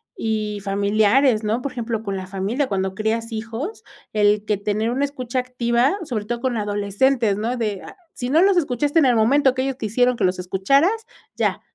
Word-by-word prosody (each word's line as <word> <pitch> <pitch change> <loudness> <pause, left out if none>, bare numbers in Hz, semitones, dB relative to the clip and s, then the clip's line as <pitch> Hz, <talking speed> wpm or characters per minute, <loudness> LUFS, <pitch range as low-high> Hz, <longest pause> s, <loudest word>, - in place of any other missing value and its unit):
y 215 -2 -2
familiares, 215 +4 +2
¿no?, 220 +4 0
por 280 - -3
ejemplo, 230 -2 -3
con 200 -2 -3
la 185 - -6
familia, 200 +9 -2
cuando 190 -1 -2
crías 225 +2 -2
hijos, 225 - -5 0.3
el 210 0 +2
que 210 -2 0
tener 210 +3 -1
una 275 +3 +1
escucha 255 -3 -3
activa, 250 +5 +1
sobre 225 -9 -4
todo 235 +2 -3
con 255 -2 -1
adolescentes, 205 +2 +1
¿no?, 235 +4 -2
de, 210 -4 -2
ah, 395 - -12 0.2
si 245 0 -4
no 320 +6 +4
los 395 -1 +4
escuchaste 290 +1 +1
en 290 - +4
el 245 - +3
momento 260 +4 +3
que 260 - 0
ellos 270 -1 -2
quisieron 245 +2 +1
que - - -3
los 185 0 +2
escucharas, 275 - +1 0.3
ya, - - 0
230 Hz, 195 wpm, -21 LUFS, 210-260 Hz, 0.3 s, no